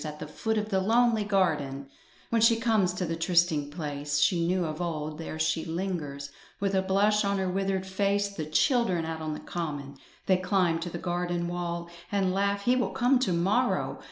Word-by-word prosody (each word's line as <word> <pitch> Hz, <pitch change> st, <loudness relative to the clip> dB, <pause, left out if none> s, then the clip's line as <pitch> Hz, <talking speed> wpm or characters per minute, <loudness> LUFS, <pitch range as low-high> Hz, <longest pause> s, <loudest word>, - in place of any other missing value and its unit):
At 150 Hz, -1 st, -6 dB
the -, -, -6 dB
foot 220 Hz, +8 st, -2 dB
of 210 Hz, 0 st, -1 dB
the 190 Hz, -2 st, +1 dB
lonely 230 Hz, +1 st, +3 dB
garden, 150 Hz, -9 st, 0 dB, 0.4 s
When 230 Hz, -1 st, +2 dB
she 230 Hz, +1 st, +6 dB
comes 220 Hz, -5 st, +2 dB
to 180 Hz, -, -2 dB
the 165 Hz, 0 st, -2 dB
trysting 165 Hz, -3 st, +2 dB
place 145 Hz, -2 st, -3 dB
She 170 Hz, +3 st, +2 dB
knew 180 Hz, 0 st, +1 dB
of 155 Hz, +1 st, -4 dB
old, 155 Hz, -2 st, -3 dB
there 160 Hz, -1 st, -5 dB
she 160 Hz, +1 st, 0 dB
lingers, 160 Hz, -5 st, -4 dB, 0.3 s
With 200 Hz, 0 st, 0 dB
a 190 Hz, -, +3 dB
blush 205 Hz, +3 st, +2 dB
on 200 Hz, 0 st, 0 dB
her 190 Hz, -1 st, -1 dB
withered 190 Hz, 0 st, -1 dB
face. 200 Hz, +1 st, +1 dB
The 160 Hz, -6 st, -5 dB
children 175 Hz, -, +2 dB
out 160 Hz, 0 st, -4 dB
on 155 Hz, -1 st, -3 dB
the -, -, -7 dB
common: 145 Hz, -5 st, -5 dB, 0.3 s
They 185 Hz, -, +4 dB
climb 185 Hz, -3 st, +1 dB
to 170 Hz, +1 st, -4 dB
the -, -, -5 dB
garden 175 Hz, -1 st, -2 dB
wall; 170 Hz, -1 st, -3 dB, 0.2 s
And 195 Hz, -2 st, +1 dB
laugh: 200 Hz, +1 st, 0 dB
"He 245 Hz, +4 st, +3 dB
will 250 Hz, -, +1 dB
come 250 Hz, +2 st, +2 dB
to 250 Hz, -7 st, 0 dB
morrow!" 195 Hz, +9 st, +1 dB
180 Hz, 200 wpm, -28 LUFS, 160-200 Hz, 0.4 s, she